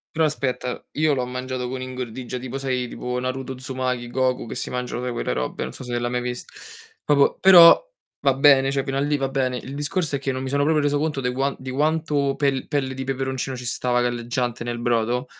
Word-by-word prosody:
Però 160 - +3
aspetta, 130 -4 -3
io 155 0 +2
l'ho 130 -2 -1
mangiato 125 0 -4
con 130 0 -4
ingordigia, 125 -1 -5
tipo 130 +1 -5
sai, 130 -2 -1
tipo 125 +1 -4
Naruto 130 +1 -3
Uzumaki, 130 -2 -3
Goku 130 -1 0
che - - -6
si - - -4
mangiano 125 -1 -3
sai 125 - -2
quelle 120 - -2
robe, 65 0 -3
non 65 - -6
so - - -9
se 120 -1 -2
l'hai 120 0 -1
mai 125 0 -1
vis 125 0 -4 0.6
proprio 145 -1 +3
però 175 -3 +9 0.4
va 135 -1 +3
bene, 135 0 +5
cioè, 135 -1 -1
fino 135 - -3
a 135 - +1
lì 145 0 +1
va 135 - -1
bene. 130 -2 -1
Il 135 +3 -7
discorso 150 +1 -1
è - - -2
che 135 0 -2
non 130 - -4
mi 130 - -4
sono 140 +2 +1
proprio 155 0 +3
reso 145 0 +2
conto 150 -2 -1
de 125 -1 -1
quan 135 +2 0
di 130 - -7
quanto 145 0 +1
pel 140 -2 0
pelle 135 -3 -1
di 130 - -5
peperoncino 130 -1 -3
ci 125 - -8
stava 125 +1 0
galleggiante 120 0 -1
nel 120 0 -4
brodo. 120 +2 0
130 Hz, 225 wpm, -23 LUFS, 125-140 Hz, 0.6 s, però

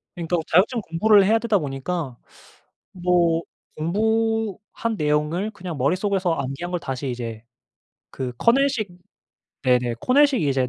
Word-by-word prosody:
그러니까 175 0 -1
자격증 220 +7 +3
공부를 200 +4 +4
해야 220 +3 +4
되다 225 -2 +2
보니까 140 -1 -4 0.7
뭐 175 -2 +2 0.3
공부한 220 +4 -1
내용을 150 +6 0
그냥 180 -6 -7
머릿속에서 185 +5 +1
암기한 140 +4 -4
걸 180 - -1
다시 135 -2 -4
이제 115 -3 -5 0.7
그 130 -2 -4
커넬식 250 - +2 0.7
네네 125 -2 +2
코넬식 275 - +4
이제 135 -3 +1
175 Hz, 280 characters per minute, -23 LUFS, 140-215 Hz, 0.7 s, 공부를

